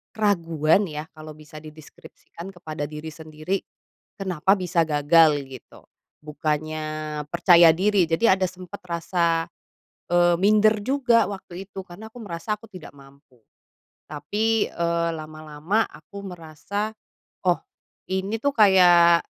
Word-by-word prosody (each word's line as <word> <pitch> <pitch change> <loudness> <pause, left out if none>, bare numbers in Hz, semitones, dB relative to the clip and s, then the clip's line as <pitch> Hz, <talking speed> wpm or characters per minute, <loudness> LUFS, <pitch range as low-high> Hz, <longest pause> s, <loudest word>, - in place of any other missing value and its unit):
keraguan 170 -3 +2
ya, 150 0 -5
kalau 155 -1 -11
bisa 155 0 -12
dideskripsikan 155 +3 -13
kepada 155 -4 -6
diri 155 +1 -7
sendiri, 155 +4 -4 0.6
kenapa 190 -1 +1
bisa 180 -2 +1
gagal, 150 0 +4
gitu, 130 -2 -14 0.4
bukannya 155 0 -3
percaya 170 -1 +6
diri. 200 0 +2
Jadi, 165 +8 +2
ada 190 0 +2
sempet 185 +2 -11
rasa, 170 -1 -1 0.7
eee, 175 0 +4
minder 215 +2 +4
juga 255 -2 +2
waktu 190 -1 -8
itu. 195 -1 -8
Karena 195 +4 -11
aku - - -20
merasa 205 +2 -4
aku 220 - -20
tidak 185 -7 -12
mampu. 140 -1 -20 0.7
Tapi, 210 +10 -1
eee, 170 0 -1
lama-lama 155 +6 -3
aku 185 +7 -12
merasa 180 +4 -5 0.6
"Oh, - - +3 0.5
ini 190 +4 -2
tuh 285 0 0
kayak, 175 -4 +6
170 Hz, 120 wpm, -23 LUFS, 155-195 Hz, 0.7 s, percaya